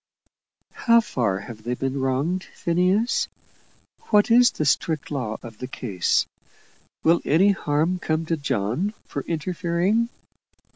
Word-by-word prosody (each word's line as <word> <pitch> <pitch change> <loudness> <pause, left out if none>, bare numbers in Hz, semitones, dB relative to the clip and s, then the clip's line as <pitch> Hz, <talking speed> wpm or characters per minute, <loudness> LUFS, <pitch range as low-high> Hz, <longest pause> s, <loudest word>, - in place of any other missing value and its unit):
"How 235 -1 +4
far 115 - -1
have 110 0 -10
they 120 +3 -2
been 135 +2 -2
wronged, 140 +8 0
Phineas? 185 +6 +1 0.8
What 210 +2 +4
is 245 +1 +7
the 155 - -3
strict 155 +2 0
law 125 -7 -3
of 115 -3 -10
the 125 - -5
case? 100 -10 0 0.8
Will 165 +2 +4
any 185 +7 +4
harm 165 0 0
come 155 -1 -1
to 165 - 0
John 145 - -1
for 140 - -4
interfering?" 180 +6 0
160 Hz, 130 wpm, -24 LUFS, 130-185 Hz, 0.8 s, is